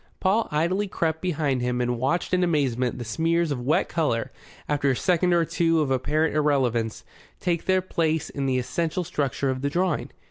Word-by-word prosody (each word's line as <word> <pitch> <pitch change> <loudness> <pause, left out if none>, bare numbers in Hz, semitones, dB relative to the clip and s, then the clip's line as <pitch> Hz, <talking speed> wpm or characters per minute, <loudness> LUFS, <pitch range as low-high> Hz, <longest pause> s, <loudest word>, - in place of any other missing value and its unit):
Paul 205 +4 +2
idly 175 +7 0
crept 160 -3 -1
behind 150 -7 0
him 125 0 -1
and 120 -1 -1
watched 155 +9 0
in 180 0 +3
amazement 130 -7 0
the 120 - -5
smears 165 +7 0
of 130 -3 -2
wet 140 +6 +1
colour, 145 -9 -1 0.4
after 145 -1 +1
a 130 - +2
second 180 +3 +2
or 170 -1 +3
two 165 0 +1
of 145 -3 0
apparent 150 +5 +1
irrelevance, 130 -7 +1 0.4
take 170 -2 -1
their 185 0 +3
place 160 -4 0
in 140 -1 -3
the 130 -1 +1
essential 155 +8 -1
structure 140 -3 -1
of 130 0 -4
the 140 - 0
drawing. 175 +1 0
150 Hz, 185 wpm, -25 LUFS, 130-170 Hz, 0.4 s, in